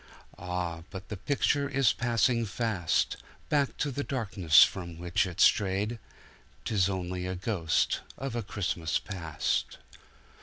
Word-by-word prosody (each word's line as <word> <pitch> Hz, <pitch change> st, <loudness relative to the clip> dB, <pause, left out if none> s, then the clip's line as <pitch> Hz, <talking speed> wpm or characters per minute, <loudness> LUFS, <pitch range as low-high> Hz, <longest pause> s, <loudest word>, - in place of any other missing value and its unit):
Ah, 90 Hz, -2 st, -3 dB
but 95 Hz, -1 st, -9 dB
the 105 Hz, -, -4 dB
picture 140 Hz, +6 st, 0 dB
is 135 Hz, -5 st, +3 dB
passing 120 Hz, 0 st, +1 dB
fastBack 115 Hz, -, -1 dB
to 145 Hz, -, -1 dB
the 145 Hz, +2 st, -3 dB
darkness 95 Hz, -, +4 dB
from 85 Hz, -3 st, -3 dB
which 90 Hz, +2 st, 0 dB
it 90 Hz, -, -8 dB
strayed— 105 Hz, +3 st, +3 dB, 0.7 s
'Tis 100 Hz, -3 st, +2 dB
only 90 Hz, -1 st, -3 dB
a 95 Hz, -, -3 dB
ghost 90 Hz, -4 st, 0 dB, 0.2 s
of 135 Hz, -3 st, -4 dB
a 120 Hz, -, -1 dB
Christmas 90 Hz, -6 st, -1 dB
Past. 85 Hz, -6 st, -2 dB
95 Hz, 125 wpm, -29 LUFS, 90-120 Hz, 0.7 s, darkness